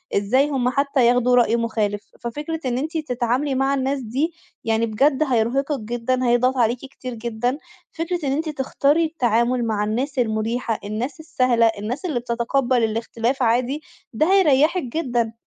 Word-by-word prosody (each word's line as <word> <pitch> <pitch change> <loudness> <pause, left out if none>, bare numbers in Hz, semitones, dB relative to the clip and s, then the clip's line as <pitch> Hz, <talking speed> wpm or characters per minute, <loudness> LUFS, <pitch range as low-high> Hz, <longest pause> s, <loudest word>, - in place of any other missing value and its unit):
إزاي 255 +9 +2
هُم 250 -3 +1
حتى 275 -1 +1
ياخدوا 250 0 +3
رأي 235 -2 +4
مخالف. 215 -3 -2
ففكرة 295 +7 -4
إن 245 -1 0
أنتِ 315 +5 -2
تتعاملي 255 -1 -1
مع 270 +1 +1
الناس 270 +1 0
دي 270 +8 -2 0.3
يعني 225 0 +1
بجد 270 +7 +2
هيرهقِك 270 +3 0
جدًا، 240 +3 -1
هيضغط 250 +2 +2
عليكِ 235 +1 +2
كتير 260 -1 -8
جدًا. 235 +3 -2 0.3
فكرة 340 +2 -3
إن 270 - +1
أنتِ 310 +3 -1
تختاري 290 +3 +1
التعامل 245 -5 +1
مع 215 -2 0
الناس 255 +6 -2
المُريحة، 225 0 -1
الناس 230 +9 -4
السهلة، 255 -7 +2
الناس 245 - -4
اللي 295 -9 -1
بتتقبل 240 +1 0
الاختلاف 230 +3 -1
عادي، 250 +6 +1 0.3
ده 310 +11 +2
هيريحِك 320 -1 +4
جدًا. 240 -4 -1
250 Hz, 150 wpm, -22 LUFS, 230-280 Hz, 0.3 s, رأي